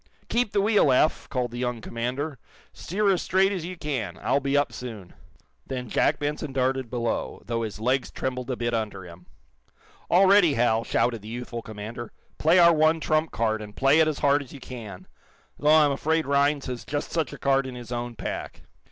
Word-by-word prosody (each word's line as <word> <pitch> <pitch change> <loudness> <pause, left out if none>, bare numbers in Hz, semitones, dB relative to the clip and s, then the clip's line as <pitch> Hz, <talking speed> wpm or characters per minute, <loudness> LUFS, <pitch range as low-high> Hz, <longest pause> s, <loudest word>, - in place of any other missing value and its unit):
"Keep 235 -3 +1
the 200 - +2
wheel, 205 -8 +4
Eph!" 150 +5 +2
called 125 -3 -2
the 120 - -6
Young 125 -1 -2
commander. 125 +5 -4 0.3
"Steer 200 +3 0
as 180 - -1
straight 190 +2 +2
as 185 -5 -3
you 180 +1 -6
can. 120 - -3
I'll - - +2
be 140 +1 0
up 145 - +1
soon." 110 -8 -8 0.5
Then 125 -3 -5
Jack - - +2
Benson 145 -1 -3
darted 130 -1 0
below, 120 -2 -3
though 115 -1 -2
his 110 -2 -5
legs 125 +4 0
trembled 125 -1 -4
a 130 - -1
bit 120 0 -2
under 105 -4 -3
him. 90 0 -13 0.8
"All 185 +3 +5
ready, 190 -6 +5
Hal!" 115 -1 +2
shouted 115 -2 0
the 105 - -11
youthful 120 0 -5
commander. 110 +2 -7 0.3
"Play 165 +4 +4
our 170 -1 +7
one 155 +1 +3
trump 155 0 +1
card, 110 -1 -1
and 105 -1 -10
play 135 +3 +4
it 160 - +5
as 155 -2 -1
hard 145 +1 +3
as 135 - -11
you 140 - -10
can! 115 -7 -9 0.5
Though 150 - +2
I'm 155 -2 +6
afraid 160 +3 0
Rhinds 140 +1 +2
has 125 -2 -5
just 145 0 -4
such 160 -7 -1
a - - -8
card 135 -1 +1
in 130 - -7
his 120 -1 -9
own 120 0 -4
pack." - - -6
130 Hz, 205 wpm, -26 LUFS, 120-155 Hz, 0.8 s, our